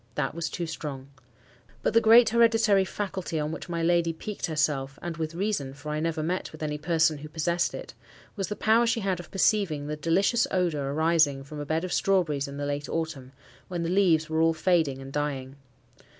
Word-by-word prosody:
That 135 -2 -1
was 165 0 -3
too 175 - -4
strong. 140 -4 -6 0.7
But - - +1
the 230 - +5
great 225 +1 +7
hereditary 225 -4 +4
faculty 190 -5 -4
on 150 0 -2
which 160 - -7
my 170 -1 -2
lady 170 -1 +2
piqued 205 +5 -5
herself, 145 -4 -1
and 175 -1 -5
with 160 0 -4
reason, 175 -9 -2
for 150 +2 -7
I 150 - -1
never 160 -1 -1
met 180 +4 -2
with 155 0 -9
any 150 -1 -3
person 160 -1 +2
who 150 +1 -9
possessed 170 +2 0
it, - - -8 0.4
was 195 -3 -2
the 210 - -4
power 225 +3 +3
she 230 0 +1
had 190 -3 -1
of 175 - -10
perceiving 190 -7 +1
the 150 +1 -3
delicious 175 - +2
odour 155 -7 0
arising 155 -3 +2
from 150 +2 -9
a 145 - -5
bed 160 +2 0
of 185 - -3
strawberries 165 -8 +1
in 140 0 -8
the 145 - -3
late 145 0 -3
autumn, 150 -6 -4 0.4
when 175 -2 -3
the 165 - -2
leaves 175 -5 +3
were 160 0 0
all 165 0 +3
fading 155 -6 +1
and 135 0 -10
dying. 140 -3 -3
160 Hz, 205 wpm, -27 LUFS, 150-185 Hz, 0.7 s, great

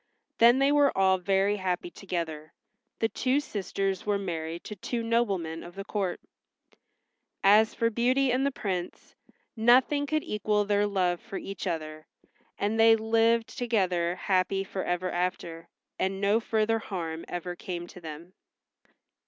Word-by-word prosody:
Then 235 +2 +7
they 275 +1 +3
were 290 -1 +4
all 190 -1 +4
very 195 +2 +1
happy 180 -2 -2
together. 165 -5 -5 0.4
The 225 - +1
two 255 +4 0
sisters 195 -5 -3
were 205 -2 +1
married 170 -3 -4
to 210 - -7
two 230 +4 -3
noblemen 195 -9 0
of 175 +1 -11
the 195 - -5
court. 195 -3 -2 1.2
As 210 +3 +5
for 230 0 +1
Beauty 255 +4 +2
and 255 +2 +1
the 280 - +2
Prince, 190 -9 -5 0.4
nothing 255 +5 +4
could 310 +1 0
equal 210 0 0
their 205 0 +2
love 180 -3 0
for 195 - -7
each 195 0 -6
other, 155 -2 -4 0.5
and 210 +2 -1
they 225 0 +7
lived 225 +1 +1
together 185 -8 0
happy 190 +1 0
forever 185 -2 -2
after, 175 -2 -3 0.3
and 190 +1 -1
no 205 +3 +3
further 225 0 0
harm 165 -6 -5
ever 175 0 -5
came 175 -1 -5
to 175 +1 -13
them. 165 +3 -9
195 Hz, 145 wpm, -28 LUFS, 175-225 Hz, 1.2 s, Then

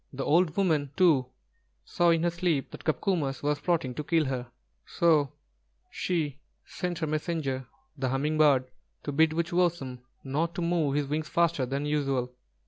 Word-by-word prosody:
The 135 0 -4
old 165 +2 +3
woman 160 -8 +2
too 160 -9 +4 0.6
saw 175 - +2
in 165 -1 +3
her 175 - +2
sleep 170 -5 -1
that - - -10
Copcomus 155 -4 -1
was 145 0 0
plotting 145 -5 0
to 150 - -4
kill 155 +1 +2
her; 130 -2 -3 0.4
so 155 -5 +2 0.6
she 155 -6 -2 0.3
sent 180 -2 -4
her 160 - -1
messenger, 150 -4 -2 0.3
the 135 -3 -2
Humming 150 +4 0
bird, 140 -4 +5 0.4
to 145 - -3
bid 160 +3 +4
Wūchowsen 170 -5 0 0.2
not 160 +5 -1
to 175 - -2
move 165 -5 +1
his 145 -1 +1
wings 150 +2 -3
faster 170 -6 +1
than 140 +3 -2
usual. 135 -4 -1
150 Hz, 160 wpm, -28 LUFS, 135-170 Hz, 0.6 s, bird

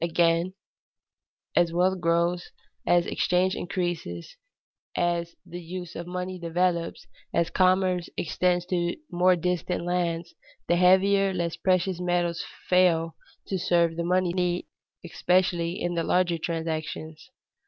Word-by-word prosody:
Again, 170 +2 +2 1.0
as 175 -1 +3
wealth 180 +2 +1
grows, 170 +1 +1 0.4
as 175 -1 +4
exchanges 185 +1 +1
increase, 175 - -4 0.6
as 170 -1 0
the 175 0 -8
use 175 0 -7
of 170 +1 -6
money 180 +1 -4
develops, 170 0 -1 0.3
as 170 0 +1
commerce 185 -1 +2
extends 180 +1 0
to 175 -1 0 0.2
more 180 +1 +4
distant 180 0 -2
lands, 170 -1 -1 0.3
the 175 - +3
heavier, 190 +2 +4
less 170 -2 -1
precious 185 -1 +1
metals 175 -2 0 0.2
fail 165 -3 +3 0.3
to 190 - -2
serve 170 -1 +2
the 170 - -2
money 180 0 +1
need, 180 -1 0 0.4
especially 175 0 +1
in 175 - -1
the 170 -1 0
larger 175 -1 +1
transactions. 160 +1 -4
175 Hz, 120 wpm, -26 LUFS, 170-180 Hz, 1.0 s, as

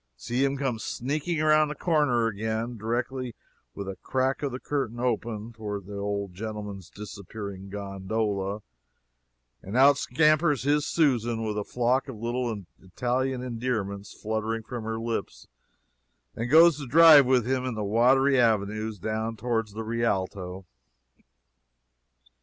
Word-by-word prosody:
see 120 - -1
him 140 0 +1
come 130 -5 -1
sneaking 150 +9 -2
around 155 0 +4
the 150 - -5
corner 145 -9 +2
again, 110 +2 -2
directly, 120 +3 -3 0.4
with 100 - -6
a 95 - -4
crack 130 +1 -1
of 140 -2 -2
the 125 - -5
curtain 130 -6 -3
open 115 -2 -2
toward 105 -3 -5
the 100 +1 -8
old 100 -1 -3
gentleman's 105 -2 -6
disappearing 100 -1 -8
gondola, 100 +1 -3 1.0
and 100 +6 -4
out 140 +1 +6
scampers 150 0 +3
his 145 +1 +2
Susan 120 -7 +1
with 105 -1 -2
a 105 - -1
flock 125 +5 0
of 130 - -6
little 120 -2 -2 0.2
Italian 125 +6 -2
endearments 115 -5 -3
fluttering 110 +1 -3
from 115 -1 -6
her 110 0 -2
lips, 115 0 -4 0.9
and 115 +2 -3
goes 160 0 +7
to 140 - -6
drive 155 -1 +8
with 125 -3 +3
him 130 0 0
in 130 -3 -3
the 105 - -3
watery 130 +6 +4
avenues 110 -1 +1
down 110 +4 -3
toward 115 0 -1
the 105 +2 -6
Rialto. 95 -5 -2
115 Hz, 140 wpm, -27 LUFS, 105-130 Hz, 1.0 s, drive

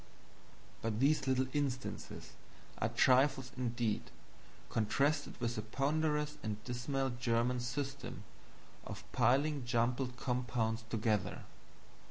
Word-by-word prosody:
But 110 -1 -1
these 140 +1 +3
little 130 0 +3
instances 140 -3 -3 0.5
are 110 - +1
trifles 130 +2 +4
indeed, 120 -3 -1 0.6
contrasted 140 +7 +1
with 120 -1 -1
the - - 0
ponderous 150 +5 0
and 110 -1 -2
dismal 130 +2 -1
German 120 0 +1
system 135 +3 -4 0.6
of - - -7
piling 145 +2 +3
jumbled 125 +1 0
compounds 125 -3 -1
together. 110 -4 0
125 Hz, 100 wpm, -35 LUFS, 115-140 Hz, 0.6 s, trifles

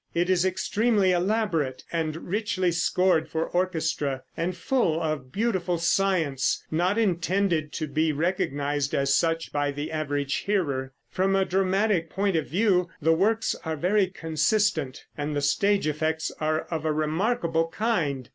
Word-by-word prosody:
It 175 +2 +2
is 180 -1 +3
extremely 200 +2 +2
elaborate, 180 - 0
and 160 -1 -3
richly 190 -2 0
scored 170 -1 +2
for 160 +2 -1
orchestra, 160 -7 -1
and 175 +2 -2
full 170 -5 +1
of 155 -6 -3
beautiful 190 - 0
science 170 -6 +1
not 180 +6 +1
intended 175 -5 +1
to 155 - -2
be 155 +2 +1
recognized 145 -3 -1
as 140 0 +2
such 165 +2 0
by 145 0 0
the 145 +2 -4
average 145 -3 -1
hearer. 140 -10 -1 0.2
From 195 +1 +1
a 195 0 +2
dramatic 190 -1 +1
point 195 -1 0
of 160 -2 0
view 180 -2 +2
the 165 +1 +3
works 215 +6 +1
are 160 -1 -2
very 190 +5 +2
consistent, 165 -3 0
and 145 +1 -2
the - - +1
stage 200 +8 +2
effects 155 +1 -1
are 155 0 +1
of 160 -2 -2
a 155 - +1
remarkable 165 +2 0
kind. 165 - -1
165 Hz, 145 wpm, -26 LUFS, 155-190 Hz, 0.2 s, is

